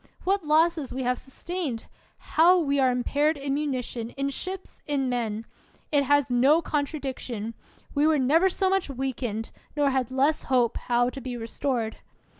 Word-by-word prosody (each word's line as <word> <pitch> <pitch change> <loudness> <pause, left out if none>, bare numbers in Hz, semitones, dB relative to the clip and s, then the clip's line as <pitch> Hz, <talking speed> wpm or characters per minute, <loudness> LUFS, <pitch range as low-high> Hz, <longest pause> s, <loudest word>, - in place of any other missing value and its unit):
What 390 0 +1
losses 310 -1 +2
we 260 +1 -3
have 250 0 0
sustained! 280 -3 -4 0.3
How 350 +3 +4
we 280 -5 +1
are 260 -1 +4
impaired 290 +5 +1
in 275 0 -2
munition, 255 -5 -2
in 275 0 -1
ships, 375 +6 -7
in 275 -3 0
men! 225 -3 -2 0.5
It 285 -2 +3
has 285 -2 +3
no 265 +6 +5
contradiction! 270 -8 -3 0.4
We 290 +1 +3
were 315 -1 +4
never 310 +8 +4
so 380 +1 0
much 385 -4 +1
weakened, 250 -4 -3 0.3
nor 285 -1 +3
had 260 -3 0
less 275 +4 +2
hope 245 -3 +2
how 245 0 +1
to 270 - -8
be 250 -1 -5
restored 230 0 -2
275 Hz, 160 wpm, -26 LUFS, 245-305 Hz, 0.5 s, no